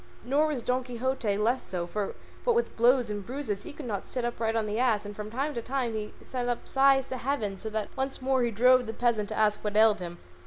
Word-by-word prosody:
Nor 290 +4 +3
was 280 -6 -2
Don 250 +1 0
Quixote 245 -4 -1
less 235 +5 +1
so, 180 -2 -3
for 200 +3 -3 0.3
what 480 -2 +3
with 475 - 0
blows 240 -1 +4
and 205 -1 -4
bruises 240 -4 -3
he - - -8
could 290 -1 -9
not 205 -5 -3
sit 250 -2 -2
upright 230 -1 -1
on 225 -1 +1
the 210 +2 -2
ass, 225 -5 +2
and 205 0 -7
from 210 0 -6
time 275 +6 -2
to 235 - -3
time 250 -1 -2
he 210 -1 -4
sent 245 -1 -3
up 240 - -3
sighs 270 0 +4
to 260 - -3
heaven, 240 -6 -1
so 220 +3 -6
that 215 -1 -4
once 270 0 -2
more 260 0 +1
he 240 - +2
drove 250 +2 +4
the 225 - -4
peasant 225 -4 +1
to - - -4
ask 210 -1 +2
what 210 0 -1
ailed 215 -1 +6
him. 175 -1 -6
235 Hz, 250 wpm, -28 LUFS, 210-260 Hz, 0.3 s, ailed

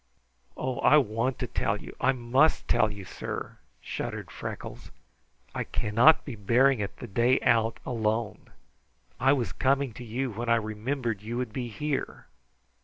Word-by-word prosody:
"Oh, 130 -1 -2
I 150 - +6
want 120 -1 0
to - - -2
tell - - -1
you! - - -10
I 135 - +4
must 130 +4 +2
tell 110 - +3
you, 100 -2 -8
sir," - - -6 0.2
shuddered - - -5
Freckles. - - -7 0.6
"I - - -2
cannot 115 +10 +4
be 135 - -5
bearing 120 +5 +3
it 100 -1 -4
the - - -7
day 120 +4 +2
out 115 -1 +2
alone. 110 -3 -2 0.7
I 135 +1 +5
was 125 -5 -1
coming 135 -2 +1
to 125 - -9
you 120 +3 -3
when 115 +3 -4
I 115 - +6
remimbered 110 +1 -2
you 115 +3 -4
would 125 -3 -3
be 125 -1 -3
here." 140 +6 -3
120 Hz, 160 wpm, -28 LUFS, 110-130 Hz, 0.7 s, I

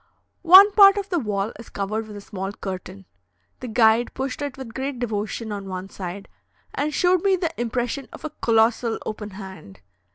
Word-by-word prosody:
One 380 +4 +9
part 395 -1 +7
of 400 0 -3
the 350 -3 0
wall 210 -3 -2
is 230 - -11
covered 215 +3 -3
with 210 - -10
a 205 - -8
small 195 -1 -5
curtain. 185 - -7 0.5
The 255 - -7
guide 230 0 +3
pushed 265 +3 -4
it 285 -2 -4
with 255 -4 -9
great 270 +1 -4
devotion 220 -1 -3
on 200 -2 -6
one 185 +1 -6
side, 195 +1 -7 0.5
and 295 +2 -1
showed 360 +2 +2
me 390 -1 +4
the 345 -3 -2
impression 240 +3 -2
of - - -10
a 310 - -4
colossal 230 -3 +1
open 210 -1 -5
hand. 190 - -11
225 Hz, 185 wpm, -23 LUFS, 200-280 Hz, 0.5 s, One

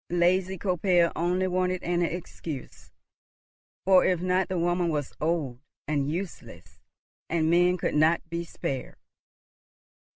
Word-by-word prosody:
Lazy 180 +2 +2
Koppel 180 -2 +2
only 180 +3 +1
wanted 185 0 0
an 175 0 0
excuse, 165 -4 -5 1.0
or, 190 -1 +6
if 180 -2 +2
not, 185 +1 +1
the 185 - -1
woman 175 0 +1
was 145 -4 -2
old 155 -6 -1 0.3
and 145 -2 0
useless, 175 +3 -7 0.5
and 160 -1 +1
men 180 +1 +4
could - - -1
not 155 +3 +3
be 170 +1 -3
spared. 135 -5 -5
175 Hz, 125 wpm, -27 LUFS, 160-180 Hz, 1.0 s, or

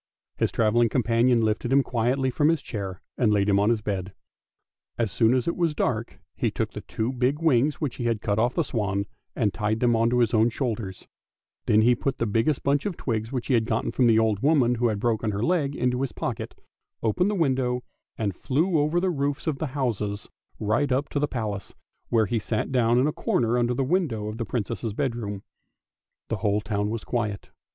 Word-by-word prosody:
His - - +1
travelling 115 +1 +3
companion 120 0 +3
lifted 110 +2 0
him 135 0 +5
quietly 130 +3 0
up - - -5
from 150 +4 +3
his 165 -4 +1
chair, 95 -5 -5 0.2
and 115 -4 +3
laid 100 -1 +2
him 100 -1 +4
on 105 +2 +3
his 115 -2 +1
bed. 95 -2 -3 0.8
As 115 -4 0
soon 115 +6 +3
as 125 - 0
it 170 - 0
was 170 -4 0
dark 115 -4 -2 0.2
he - - 0
took - - -2
the - - -7
two 115 +4 -3
big 130 +3 +1
wings 150 -3 +3
which 145 -5 -4
he 120 - -3
had 115 -2 +1
cut 105 +1 -1
off 120 +2 +1
the 170 - +2
swan, 100 -7 -1 0.3
and 105 -5 +1
tied 110 0 -1
them 120 -1 +3
on 115 +1 +3
to 125 - +1
his 120 -2 +2
own 110 +1 +4
shoulders; 115 -6 -4 0.6
then 110 +1 +5
he 120 +2 +5
put 135 +3 -2
the 115 - 0
biggest 115 +7 +1
bunch 140 +5 +1
of 185 - -4
twigs 110 -3 -2 0.2
he 135 - 0
had 115 -2 +3
got 115 -1 -1
from 125 - +3
the 115 -1 +5
old 110 -3 +2
woman 135 -3 +3
who 120 0 +1
had 105 -3 -1
broken 110 0 0
her 105 +1 -2
leg 150 -4 +1
into 125 -1 0
his 135 - -2
pocket, - - -5 0.4
opened 145 - +2
the 210 - 0
window, 130 -7 0 0.3
and 100 -4 -2
flew 160 - +1
over 155 +4 +2
the 185 +1 +1
roofs 145 -1 -2
of 150 -4 -1
the 160 - -1
houses 105 -6 -2 0.3
right 120 +7 +1
up 135 +3 0
to 145 - -1
the 145 - +1
Palace, 105 -7 -4 0.3
where 115 -2 +3
he 115 +3 -1
sat 110 +4 -2
down 120 -2 +3
in 125 - +4
a 150 - 0
corner 115 0 0
under 120 0 +1
the 135 - 0
window 130 - 0
of 110 +2 -7
the 115 - -1
Princess' 110 0 -3
bedroom. 105 -5 -3 0.9
The - - -1
whole 105 -1 +1
town 105 -1 -1
was 115 0 -4
quiet. 105 -5 -3
120 Hz, 220 wpm, -25 LUFS, 110-135 Hz, 0.9 s, him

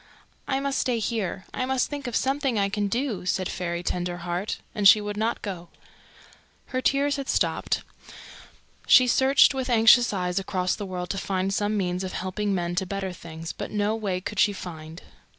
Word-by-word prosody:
"I 270 -1 0
must 275 0 -1
stay 245 -2 +1
here. 215 -4 -2
I - - -2
must 265 -1 +1
think 285 -3 -5
of 240 - -3
something 270 -3 0
I 200 -1 +2
can 205 0 -1
do," 235 -2 -2
said 185 0 0
Fairy 175 -1 -3
Tenderheart; 175 +2 -3 0.2
and 205 -2 +4
she 215 - +9
would 205 0 -4
not 220 +2 -1
go. 175 -4 -6 1.0
Her 255 - -1
tears 280 +2 +1
had 275 -1 -5
stopped. - - 0 1.0
She 255 - +8
searched 265 +3 +5
with 260 -1 -3
anxious 235 +1 +6
eyes 180 -2 -1
across 185 -1 -1
the 205 - -6
world 180 -1 -4
to 195 - -3
find 190 0 -1
some 210 +1 0
means 180 -1 -1
of 185 - -5
helping 195 +2 -2
men 175 -1 -2
to 190 0 0
better 195 -1 -3
things, 165 -1 -8
but - - -6
no 210 +1 0
way 200 -5 -2
could 190 +2 -5
she 205 - +4
find. 165 -3 -9
200 Hz, 185 wpm, -25 LUFS, 180-240 Hz, 1.0 s, she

